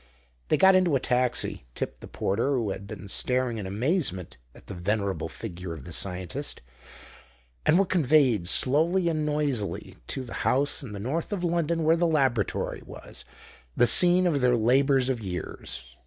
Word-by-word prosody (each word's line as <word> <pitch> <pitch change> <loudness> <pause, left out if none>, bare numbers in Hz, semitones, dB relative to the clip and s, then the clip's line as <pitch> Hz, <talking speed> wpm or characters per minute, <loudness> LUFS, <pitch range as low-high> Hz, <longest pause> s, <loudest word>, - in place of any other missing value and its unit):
They - - +2
got 190 0 +6
into 185 -5 +3
a - - +2
taxi, 125 - -1
tipped - - -5
the - - -9
porter, 115 +8 -1
who 115 -6 -1
had 100 +1 -7
been 100 -1 -9
staring 125 +3 0
in 95 - -5
amazement 105 - -1 0.2
at - - -16
the - - -8
venerable 100 +2 -2
figure 90 0 -7
of 80 -5 -9
the - - -10
scientist, 95 - -3 1.1
and 160 - +5
were 195 - +4
conveyed 140 - +2
slowly 165 - +3
and 155 -2 -1
noisily 145 -9 -2
to 135 - -3
the 120 - -9
house 140 +4 +1
in 125 -7 -8
the 100 - -6
north 145 - -3
of 195 -4 -3
London 170 -1 0
where 160 +1 +4
the 170 +1 +1
laboratory 135 - 0
was, - - -10 0.5
the - - +5
scene 180 +8 +5
of 150 -6 +1
their 125 -1 +3
labours 130 +3 +3
of 130 -3 -1
years. 90 - -5
130 Hz, 170 wpm, -26 LUFS, 100-155 Hz, 1.1 s, got